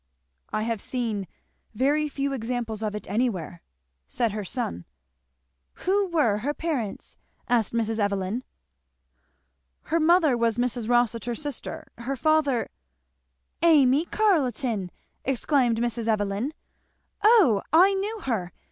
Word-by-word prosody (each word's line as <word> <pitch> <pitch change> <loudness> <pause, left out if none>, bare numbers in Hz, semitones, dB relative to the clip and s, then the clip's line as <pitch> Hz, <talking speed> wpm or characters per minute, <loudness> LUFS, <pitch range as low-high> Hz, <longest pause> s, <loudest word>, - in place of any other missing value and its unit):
"I 215 - -1
have 225 -2 -2
seen 225 -6 -3 0.5
very 290 +6 +2
few 275 0 -2
examples 230 -3 -3
of 210 -1 -2
it 210 - -7
anywhere," 195 - -2 0.5
said 235 -3 0
her 210 0 -4
son. 180 - -4 1.0
"Who 395 +2 +2
were 290 - +2
her 285 +7 -2
parents?" 275 -11 -4 0.3
said 240 -3 +3
Mrs. 225 0 -1
Evelyn. 200 +3 -1 1.4
"Her 330 +4 0
mother 320 -4 +4
was 230 -1 +1
Mrs. 245 -2 -1
Rossitur's 240 +1 +1
sister, 290 -4 -6
her 255 +4 -3
father 295 -4 +2 0.5
" 65 - -46 0.2
"Amy 275 +3 +4
Carleton!" 255 - +1 0.3
exclaimed 260 -2 +1
Mrs. 235 -1 -2
Evelyn, 210 +4 0 0.7
"O 410 - +6
I 365 +6 +6
knew 410 +3 -3
her! 200 - -2
240 Hz, 120 wpm, -26 LUFS, 215-290 Hz, 1.4 s, O